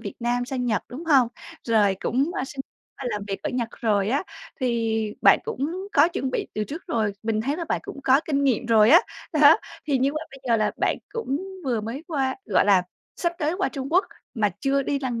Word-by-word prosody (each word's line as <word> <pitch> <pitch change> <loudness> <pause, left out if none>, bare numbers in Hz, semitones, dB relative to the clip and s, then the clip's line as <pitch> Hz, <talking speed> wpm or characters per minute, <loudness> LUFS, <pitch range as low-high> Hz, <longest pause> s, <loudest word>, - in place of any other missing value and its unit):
Việt - - -6
Nam 245 +1 0
sang 250 0 -3
Nhật, 220 -3 0
đúng 290 +7 -8
hông? 270 -7 +4 0.4
Rồi 210 -4 +3
cũng 270 +6 +1
qua 395 - -2
xin 270 0 -7 0.4
qua 270 - -7
làm 210 - -3
việc 195 - -4
ở - - -2
Nhật 240 -2 -2
rồi 205 -3 +1
á, 275 +5 +1 0.4
thì 225 -3 0
bạn - - +7
cũng 345 +9 -4
có 290 +4 +5
chuẩn 265 -6 -3
bị - - -2
từ 215 0 -1
trước 320 - -8
rồi, 220 - 0
mình 220 -1 0
thấy 280 +6 -1
là 340 - -3
bạn - - -1
cũng 280 - -8
có 265 +3 +5
kinh 280 -2 0
nghiệm 250 -3 +1
rồi 220 0 +5
á. 340 - +9 0.3
Đó, 300 +2 +7 0.3
thì 275 -3 +2
như 275 +2 +1
vậy 305 +1 -3
bây 270 - -12
giờ 230 - +4
là 215 -1 +1
bạn - - +1
cũng 445 - -2 0.3
vừa 240 -4 0
mới 235 +8 -5
qua 270 -4 -1
gọi 195 - +3
là, 195 -3 +5 0.3
sắp 345 -1 0
tới 315 +1 0
qua 390 - +1
Trung 275 -3 -5
Quốc 370 +3 +4 0.3
mà 210 -3 +1
chưa 275 0 +1
đi 280 +1 -1
lần 245 -4 -2
260 Hz, 235 wpm, -24 LUFS, 225-285 Hz, 0.4 s, á